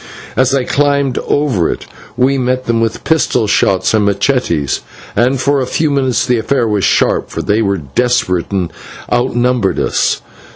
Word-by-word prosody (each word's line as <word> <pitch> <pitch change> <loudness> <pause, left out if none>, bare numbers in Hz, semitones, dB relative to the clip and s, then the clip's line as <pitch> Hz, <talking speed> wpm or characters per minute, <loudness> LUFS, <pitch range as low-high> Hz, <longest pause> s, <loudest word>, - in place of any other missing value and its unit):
As 130 -1 +3
they 135 -2 0
climbed 140 -2 +1
over 130 - +1
it - - -4 0.3
we 135 +2 +2
met 130 0 -1
them 115 -1 0
with 115 -1 -2
pistol 150 -7 +1
shots 95 -2 +2
and 105 -2 +2
/machetes/, 100 - 0 0.4
and 125 +3 +2
for 140 +1 +1
a 130 - -2
few 155 +3 0
minutes 130 -3 +1
the 125 -2 +1
affair 120 +1 0
was 105 -3 0
sharp, - - +2
for - - -4
they 105 +2 +1
were 100 -2 0
desperate, 90 - 0
and 95 -4 -2 0.4
outnumbered 120 -3 +1
us. - - 0
125 Hz, 165 wpm, -14 LUFS, 100-135 Hz, 0.4 s, As